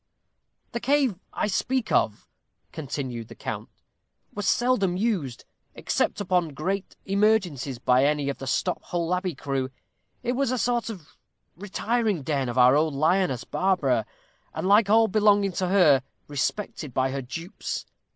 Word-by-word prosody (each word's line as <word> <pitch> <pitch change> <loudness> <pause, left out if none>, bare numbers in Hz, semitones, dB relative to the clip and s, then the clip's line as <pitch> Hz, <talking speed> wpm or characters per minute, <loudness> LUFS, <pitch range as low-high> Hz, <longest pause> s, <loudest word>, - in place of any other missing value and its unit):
"The 235 - -3
cave 260 -6 +1
I - - -1
speak 245 +4 -1
of," 105 - +1 0.4
continued 130 -6 -5
the - - -12
count, - - -5 0.6
"was 205 -2 -1
seldom 210 -8 +2
used, 185 - -1 0.3
except - - -1
upon 180 -6 0
great 190 +6 -3
emergencies, 195 - +1
by 125 +2 +3
any 145 -1 +1
of 140 - -3
the 135 - -6
Stop 180 +8 0
Hole 175 0 -1
Abbey 180 -3 -1
crew. 135 -1 -2 0.5
It 240 - 0
was 265 0 0
a 255 - 0
sort 240 +1 0
of 180 -9 -10 0.4
retiring 210 - -1
den 135 -3 -1
of 120 - -4
our 125 +1 +6
old 155 -1 +2
lioness 160 -3 +2
Barbara, 140 - +1 0.5
and, - - -2
like 205 +1 +5
all 225 +1 +5
belonging 205 -1 +3
to 185 +1 -1
her, 175 -8 +5 0.3
respected 145 - -3
by 130 0 +1
her 135 0 -3
dupes. 165 - -6
180 Hz, 150 wpm, -26 LUFS, 140-210 Hz, 0.6 s, our